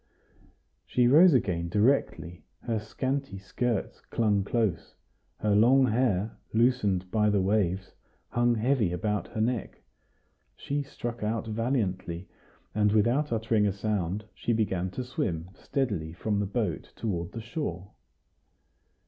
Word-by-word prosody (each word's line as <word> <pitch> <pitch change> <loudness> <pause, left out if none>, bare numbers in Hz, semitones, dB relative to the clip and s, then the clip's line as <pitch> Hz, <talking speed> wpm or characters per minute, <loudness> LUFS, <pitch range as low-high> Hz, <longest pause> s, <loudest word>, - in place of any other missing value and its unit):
She 125 -1 +2
rose 160 +5 +7
again 85 -8 0
directly; 105 - +1 0.2
her 115 -2 -1
scanty 130 +1 -3
skirts 110 +3 -2
clung 105 -4 +2
close; 105 -5 -1 0.4
her 105 - 0
long 125 +6 +5
hair, 110 -4 0 0.2
loosened 105 -7 +2
by 105 -1 +3
the 105 -1 +2
waves, 95 -1 0 0.4
hung 120 0 +2
heavy 115 -4 +1
about 100 +1 -1
her 110 - -4
neck. 120 -1 -2 0.7
She 145 +1 -2
struck 120 -4 -6
out 110 +2 -1
valiantly, 105 -6 -2 0.5
and, 105 -1 +3
without 120 +8 +2
uttering 110 -2 +2
a - - +1
sound, 100 -1 -2
she 120 - -1
began 95 -5 0
to 125 +7 -5
swim 95 - -3
steadily 100 - -2
from 100 +4 -1
the 100 - 0
boat 100 -5 -3
toward 90 -6 -3
the 115 - -5
shore. 110 - -5
110 Hz, 130 wpm, -28 LUFS, 95-120 Hz, 0.7 s, rose